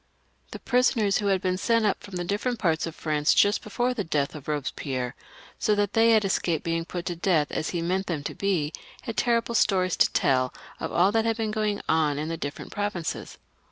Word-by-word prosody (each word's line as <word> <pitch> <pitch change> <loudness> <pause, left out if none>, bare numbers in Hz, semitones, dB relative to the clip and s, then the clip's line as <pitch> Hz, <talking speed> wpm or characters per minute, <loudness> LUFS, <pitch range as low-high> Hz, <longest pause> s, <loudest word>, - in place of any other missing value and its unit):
The - - -7
prisoners 245 -5 +2
who 205 - -1
had 190 -2 +2
been 185 0 0
sent 230 +1 +2
up 205 - +1
from 200 - -9
the 175 - -2
different 210 +7 -1
parts 165 -5 0
of 165 - -8
Prance 150 -1 +2
just 205 +1 +4
before 245 +4 -1
the 220 -5 -2
death 145 -5 -1
of 150 -4 -9
Eobespierre, 135 -4 -3 0.5
so 210 - +2
that 205 -1 0
they 225 +1 +5
had 215 -2 +4
escaped 170 -4 0
being 165 0 -1
put 175 0 -5
to 175 - -2
death 165 -4 +1
as 155 - -2
he 170 -2 -2
meant 185 +3 -1
them 155 -5 -2
to - - -4
be, 170 -7 -1 0.3
had 230 - -5
terrible 235 0 +1
stories 185 -5 +2
to - - +4
teU 130 -1 +2 0.3
of - - -4
all 185 +3 +4
that 225 +1 +1
had 225 0 +1
been 220 -2 -1
going 215 -2 -1
on 155 -3 +2
in 155 +2 -3
the 165 - -2
different 145 -2 -6
pro 205 0 -1
vinces. 175 -5 -5
185 Hz, 225 wpm, -26 LUFS, 160-215 Hz, 0.5 s, they